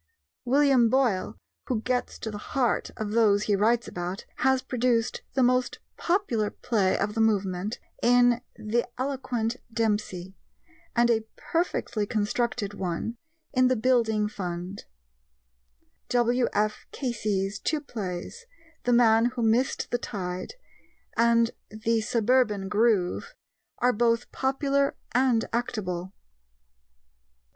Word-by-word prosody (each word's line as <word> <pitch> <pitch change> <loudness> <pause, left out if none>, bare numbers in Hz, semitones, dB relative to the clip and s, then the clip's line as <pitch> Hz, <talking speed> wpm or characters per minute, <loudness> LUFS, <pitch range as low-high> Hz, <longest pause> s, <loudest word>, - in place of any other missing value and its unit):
William 265 -2 +4
Boyle, 240 -7 +1 0.3
who 230 -4 -1
gets 250 -1 -1
to 220 - -5
the 205 - -6
heart 250 +2 0
of 215 -1 -3
those 210 -2 +4
he 210 - +2
writes 225 +4 +2
about, 180 +2 -5
has 265 0 +2
produced 245 -2 0
the 265 - +3
most 250 0 +2 0.2
popular 295 - 0
play 210 -6 0
of 205 +1 -1
the 225 - 0
movement 200 -1 0 0.2
in 245 0 +4
The 225 +2 -1
Eloquent 250 -3 -2
Dempsey, 205 -5 -1 0.6
and 235 0 +4
a 225 -1 +1
perfectly 245 - -1
constructed 215 0 -1
one 190 +5 -3 0.4
in 255 -1 +4
The 255 - +2
Building 220 -3 +2
Fund. 180 -1 -5 1.2
W.F. 240 -3 +1
Casey's 205 -6 -2
two 310 - 0
plays 220 - -6 0.4
The 245 - +3
Man 230 -1 +5
Who 245 -1 -1
Missed 230 +4 +1
the 245 - +1
Tide 185 - -5 0.6
and 230 0 +4 0.2
The 220 +1 0
Suburban 220 -3 +1
Groove 205 -4 +1 0.4
are 250 +1 +3
both 230 +1 +1
popular 275 +1 +1 0.2
and 245 -2 +3
actable. 190 -6 -2
230 Hz, 115 wpm, -27 LUFS, 210-250 Hz, 1.2 s, Man